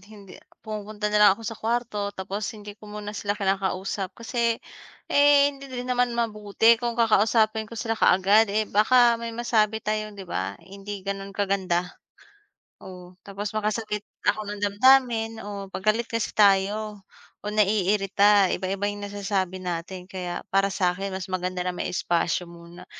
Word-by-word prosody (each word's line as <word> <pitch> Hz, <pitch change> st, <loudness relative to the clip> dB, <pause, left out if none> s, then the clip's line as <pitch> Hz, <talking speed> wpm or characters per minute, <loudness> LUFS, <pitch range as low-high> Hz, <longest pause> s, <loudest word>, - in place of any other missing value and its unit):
hindi 200 Hz, -1 st, -14 dB, 0.2 s
pumupunta 210 Hz, 0 st, -4 dB
na 210 Hz, -, +3 dB
lang 205 Hz, -, +8 dB
ako 225 Hz, -, -12 dB
sa 225 Hz, 0 st, -5 dB
kuwarto, 225 Hz, -3 st, -1 dB
tapos 195 Hz, +2 st, -4 dB
hindi 205 Hz, 0 st, -9 dB
ko 210 Hz, +1 st, -15 dB
muna 210 Hz, 0 st, -6 dB
sila 205 Hz, 0 st, -3 dB
kinakausap, 195 Hz, -1 st, -2 dB
kasi, 235 Hz, 0 st, -1 dB, 0.6 s
eh, 285 Hz, 0 st, +5 dB
hindi 275 Hz, 0 st, -12 dB
din 250 Hz, -1 st, -5 dB
naman 250 Hz, -1 st, +1 dB
mabuti 225 Hz, 0 st, +2 dB
kung 235 Hz, -1 st, -2 dB
kakausapin 220 Hz, -1 st, +2 dB
ko 230 Hz, -, -10 dB
sila 225 Hz, 0 st, -2 dB
kaagad, 205 Hz, +1 st, +4 dB
eh, 215 Hz, +2 st, +1 dB
baka 235 Hz, +3 st, +4 dB
may 230 Hz, 0 st, -4 dB
masabi 220 Hz, -2 st, +1 dB
tayo, 215 Hz, 0 st, -1 dB
'di 195 Hz, -, -8 dB
ba, 95 Hz, -, -4 dB
hindi 195 Hz, 0 st, -8 dB
gano'n 195 Hz, 0 st, -4 dB
kaganda. 190 Hz, -3 st, 0 dB, 0.9 s
Oh, 180 Hz, -1 st, -12 dB
tapos 200 Hz, +1 st, -5 dB
makasakit 215 Hz, 0 st, -2 dB, 0.2 s
ako 215 Hz, -1 st, -1 dB
ng 205 Hz, 0 st, -6 dB
damdamin, 225 Hz, +1 st, +3 dB
oo, 200 Hz, -1 st, -7 dB
'pag 200 Hz, +3 st, 0 dB
galit 230 Hz, +2 st, -3 dB
kasi 230 Hz, -1 st, -2 dB
tayo, 205 Hz, +1 st, +2 dB, 0.4 s
o 210 Hz, -, -3 dB
naiirita, 200 Hz, -1 st, +3 dB
iba-iba 195 Hz, +2 st, -3 dB
yung 205 Hz, 0 st, -8 dB
nasasabi 195 Hz, -2 st, -2 dB
natin, 180 Hz, +1 st, -5 dB
kaya 180 Hz, -2 st, -5 dB
para 195 Hz, 0 st, +3 dB
sa'kin 190 Hz, +1 st, -1 dB
mas 190 Hz, -1 st, -4 dB
maganda 185 Hz, 0 st, -3 dB
na 180 Hz, -, -1 dB
may -, -, -3 dB
espasyo 175 Hz, 0 st, 0 dB
muna. 170 Hz, 0 st, -13 dB
205 Hz, 155 wpm, -25 LUFS, 195-220 Hz, 0.9 s, lang